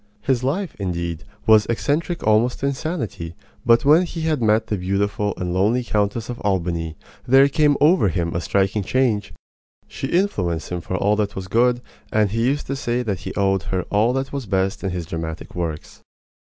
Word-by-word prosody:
His 130 -2 0
life, 170 +8 -1
indeed, 85 -2 -3 0.2
was 110 -1 +5
eccentric 150 +8 -1
almost 110 +3 +2
to - - 0
insanity; 130 - -3 0.3
but 120 +2 +4
when 155 +4 +6
he 175 -2 -4
had 155 -4 0
met 110 0 +3
the 105 - -2
beautiful 100 +2 -1
and 90 -1 -3
lonely 105 +7 +2
Countess 105 0 -1
of 120 - -6
Albany 85 -5 -1 0.3
there 135 +2 +6
came 145 0 +3
over 155 - +5
him 85 -2 -1
a 85 - 0
striking 100 +3 +1
change. 115 -2 0 0.6
She 135 - -5
influenced 95 - 0
him 90 -1 -2
for 95 - -4
all 105 +3 +2
that 105 -2 -1
was 95 -1 -5
good, 120 +4 +2 0.3
and 105 -2 +2
he 115 +1 0
used 145 +2 0
to 135 - -3
say 125 -2 -1
that 100 -6 -2
he - - -6
owed 95 -1 +2
her 95 -2 0
all 105 +4 +3
that 135 +1 -3
was 135 -5 -4
best 95 0 0
in 95 - 0
his 90 -2 -4
dramatic 80 0 -6
works. 85 -3 -5
105 Hz, 190 wpm, -22 LUFS, 95-130 Hz, 0.6 s, when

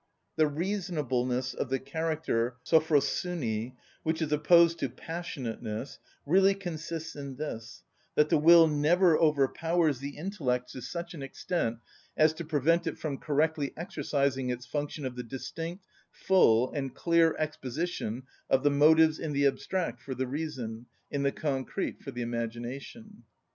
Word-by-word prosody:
The 155 -1 +4
reasonableness 145 -8 -1
of 130 - -3
the 135 - +1
character 140 -5 -1
σωφροσυνη, 150 -6 +1 0.3
which 160 0 -1
is 160 -2 -2
opposed 170 +2 +5
to 135 - -1
passionateness, 135 -6 -5 0.3
really 190 +5 +4
consists 165 -3 -5
in 140 -2 -6
this, 120 -5 -6 0.3
that 150 0 +4
the - - +4
will 165 +1 +8
never 160 +4 +4
overpowers 155 0 +2
the 140 +1 -6
intellect 145 -9 -2
to 130 - -8
such 170 +4 -5
an 155 - -8
extent 135 -3 -2 0.4
as 155 0 +5
to 165 +2 -6
prevent 165 +3 +1
it 160 - -3
from 145 -4 -4
correctly 150 -1 0
exercising 140 -6 -1
its 125 0 -3
function 145 +2 -4
of 130 -1 -4
the 125 - -4
distinct, 165 - -6 0.2
full, 125 -11 +3
and 135 -3 -4
clear 170 -1 +3
exposition 145 -4 -3 0.3
of 135 +1 +3
the 145 - +4
motives 155 +2 +5
in 155 -2 -3
the 140 0 +2
abstract 140 -2 -1
for 130 - -5
the 130 - -1
reason, 125 -5 -5 0.2
in 140 - -1
the 140 0 +2
concrete 140 +6 -3
for - - -8
the 120 -2 -4
imagination. 120 - -6
150 Hz, 145 wpm, -29 LUFS, 130-165 Hz, 0.4 s, will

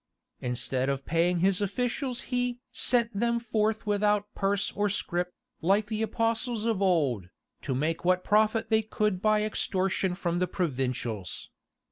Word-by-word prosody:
Instead 125 +1 -1
of 135 0 -2
paying 170 +1 +2
his 190 +1 +3
officials 245 +5 -1
he 245 0 0
"sent 235 -2 +2
them 235 +3 +1
forth 220 -1 0
without 210 0 +1
purse 200 0 0
or 205 0 0
scrip, 180 -2 -1 0.3
like 195 +5 +3
the 215 0 -3
apostles 230 0 0
of 225 -4 0
old, 140 - +2 0.3
to 135 - -2
make 155 +5 -1
what 180 +1 +2
profit 215 +2 +2
they 220 0 +5
could 210 -3 -1
by 215 0 +3
extortion 190 -3 0
from 175 -1 -1
the 180 - +1
provincials." 130 - -2
200 Hz, 145 wpm, -28 LUFS, 175-220 Hz, 0.3 s, they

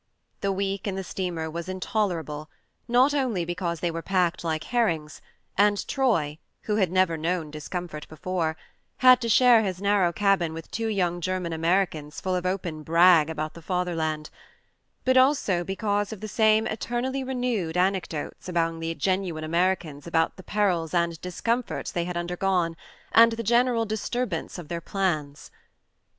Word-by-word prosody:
The 200 - 0
week 195 +1 -2
in 195 - -2
the 190 - -3
steamer 175 -3 -3
was 170 +2 -5
intoler 185 0 -1
able, 150 0 -8 0.4
not 250 +4 +4
only 245 -11 0
because 175 -1 -3
they 175 - 0
were 165 0 -4
packed 180 -2 0
like 160 -2 -1
herrings, 170 -11 -1 0.4
and 205 0 +3
Troy 170 - +1 0.2
(who 210 -1 0
had 190 -5 +2
never 185 -3 +2
known 165 -1 -2
discomfort 155 +1 -6
before) 160 0 -2 0.5
had 255 0 +8
to 230 - -2
share 240 0 +6
his 190 -4 -2
narrow 200 -3 +2
cabin 190 -4 +1
with 165 - -9
two 225 0 -2
young 180 -5 0
German 185 -1 -2
Americans 160 -2 0
full 185 -1 -2
of 180 0 -1
open 175 -4 -3
brag 165 0 +5
about 155 -1 -3
the 170 - -11
Fatherland; 165 -4 -2 0.7
but 260 0 +4
also 255 -10 +3
because 205 +2 -1
of 220 - -7
the 215 - -6
same 220 +1 +3
eternally 245 +4 -2
renewed 245 -10 -2
anec 185 0 +1
dotes 155 +3 -6
among 165 -2 0
the 165 0 -3
genuine 185 -4 -1
Americans 170 -3 -1
about 165 -1 +1
the - - -11
perils 185 -5 0
and 170 -1 0
discomforts 230 +7 -2
they 170 -1 -1
had 180 0 -4
undergone, 180 -1 0 0.4
and 230 0 +7
the 230 0 -4
general 235 +1 +3
dis 215 -1 -3
turbance 240 -11 -2
of 175 -4 -8
their 170 +1 -4
plans. 155 -7 -2
180 Hz, 165 wpm, -26 LUFS, 165-210 Hz, 0.7 s, had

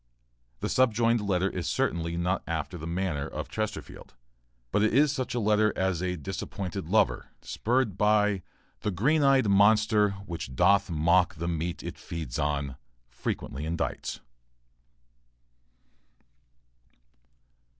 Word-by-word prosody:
The - - -1
subjoined 115 -2 +3
letter 95 -2 +1
is 90 -3 -4
certainly 85 0 -1
not 90 +2 0
after 80 +2 -3
the 80 -1 -6
manner 85 -5 -2
of - - -6
Chesterfield, 110 - -5 0.6
but 105 - +2
it 110 +2 +2
is 145 +1 +5
such 130 -3 -3
a - - +1
letter 105 0 +3
as 95 -2 0
a 90 -1 -1
disappointed 95 +1 -5
lover, - - +2 0.2
spurred 120 -4 0
by 105 -2 +3 0.4
The - - -2
green 130 - +2
eyed 135 -4 +4
monster, 105 +1 +4
which 80 -8 -6
doth 100 +8 +4
mock 85 +3 +3
The 85 +2 -4
meat 85 0 -3
it - - -7
feeds 80 -8 -5
on, 70 -3 -1 0.3
frequently 70 +3 -4
indites. 80 +2 -3
95 Hz, 125 wpm, -28 LUFS, 85-105 Hz, 0.6 s, is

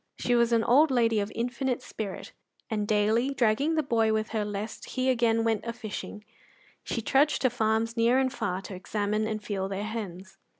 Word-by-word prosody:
She 245 - 0
was 235 0 +3
an 230 -1 +3
old 290 +7 +5
lady 230 -4 +2
of 205 +1 -2
infinite 245 +2 -2
spirit, 210 -5 -6 0.4
and 210 -2 -1
daily, 220 +6 +2
dragging 260 +7 +2
the 310 - +1
boy 225 -4 +2
with 215 0 0
her 220 -2 -1
lest 205 +1 -5
he 260 0 +3
again 230 -2 +2
went 225 -2 0
a 230 - -4
fishing, 215 -2 -7 0.6
she 230 - -3
trudged 285 +5 +2
to 255 - +3
farms 225 0 0
near 235 +2 +3
and 265 -1 +1
far 195 -7 -3
to 195 - -8
examine 210 +3 -1
and 215 -1 -4
feel 195 -2 -3
their 195 +1 -3
hens. 195 -4 -6
225 Hz, 195 wpm, -28 LUFS, 210-245 Hz, 0.6 s, old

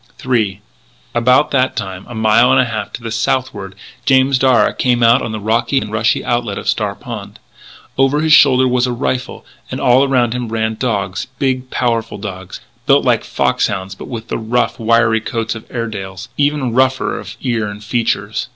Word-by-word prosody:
III 110 -6 0 0.5
About 125 +5 +3
that 130 -1 +1
time, 95 -1 -5
a 120 - -8
mile 110 +2 +4
and - - +4
a 125 - +4
half 110 -3 -4
to 115 - -8
the 115 - -4
southward, 115 -4 -2 0.3
James 130 0 +3
Darragh 130 -2 +3
came 120 -2 +2
out 115 +3 +5
on 115 - -4
the 110 - -4
rocky 115 +6 0
and 110 -5 -1
rushing 110 +1 +1
outlet 120 -4 -1
to - - -6
Star - - -1
Pond. - - -8 0.6
Over 135 +3 +3
his 160 -1 +3
shoulder 130 -3 +6
was 125 0 +1
a - - -1
rifle, 130 0 -3 0.2
and - - -4
all 125 +2 +4
around 125 -4 +1
him 125 -1 -3
ran 110 0 -1
dogs, 105 -4 -2
big, 130 -1 -1
powerful 115 -3 -1
dogs, 95 -2 -8 0.3
built - - +4
like - - +2
foxhounds 95 +1 -1
but 95 - -10
with 115 -2 -7
the - - -2
rough, 120 +2 -1
wiry 110 -1 +3
coats 115 0 -3
of 110 - -11
Airedales, 105 -3 -5
even 145 -4 0
rougher 130 -4 +1
of 105 +2 -9
ear 115 -5 -1
and 105 +1 -8
features. 115 +2 -1
115 Hz, 185 wpm, -16 LUFS, 110-130 Hz, 0.6 s, shoulder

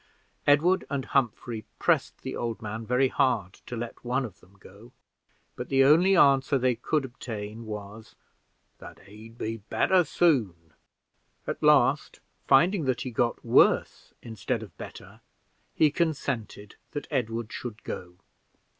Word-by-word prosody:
Edward 165 +6 +4
and 140 -3 -2
Humphrey 120 -3 -1
pressed - - 0
the - - -5
old 115 -2 -3
man 110 +1 -6
very 130 +2 +2
hard 110 -10 0
to 125 - -5
let 120 0 -7
one 125 +2 -1
of 100 -6 -11
them 95 +2 -23
go, 105 +5 -16 0.6
but - - -7
the 135 0 +4
only 175 +7 +5
answer 135 -1 +4
they 130 -1 +2
could 135 +5 -1
obtain 115 -3 -7
was 105 +1 -8 0.6
"that - - -12
he'd 110 +3 -14
be 115 0 -3
better 180 - +2
soon." 105 - 0 0.7
At - - -4
last, - - +3 0.3
finding 170 +5 +4
that 130 -1 0
he 130 - -4
got 120 +1 -1
worse - - +3
instead 110 -4 -3
of - - -13
better, - - -11 0.5
he 155 -2 +4
consented 135 - -3 0.2
that 145 - -4
Edward 115 -4 -2
should 115 -4 -7
go. 90 0 -7
120 Hz, 140 wpm, -27 LUFS, 110-140 Hz, 0.7 s, only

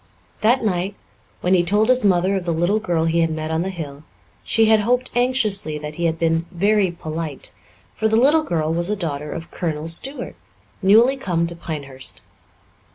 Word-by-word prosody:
That 230 +2 +3
night, 190 0 -1 0.5
when 180 - +2
he 180 - +5
told 205 +5 +2
his 255 -1 +4
mother 190 0 +2
of 190 - -2
the 170 - 0
little 175 +6 +1
girl 175 -6 0
he 165 +1 +1
had 165 -1 +2
met 155 0 -4
on 160 +1 0
the 190 - -2
hill, 150 -6 -7 0.4
she 225 - +3
had 220 0 +5
hoped 245 +4 0
anxiously 230 -10 +1
that 150 0 -7
he 170 +2 -3
had 165 -1 0
been 165 0 0
"very 200 +2 +2
polite," 160 -3 -6 0.4
for 220 - 0
the 220 - +1
little 285 +7 +5
girl 160 - -1
was 170 +2 +2
a 210 - +1
daughter 150 -6 -4
of 165 0 -7
Colonel 160 -2 -3
Stuart, 260 - -2 0.5
newly 225 +7 +5
come 175 -10 -1
to 170 0 -4
Pinehurst. 140 -6 -6
175 Hz, 190 wpm, -21 LUFS, 160-215 Hz, 0.5 s, he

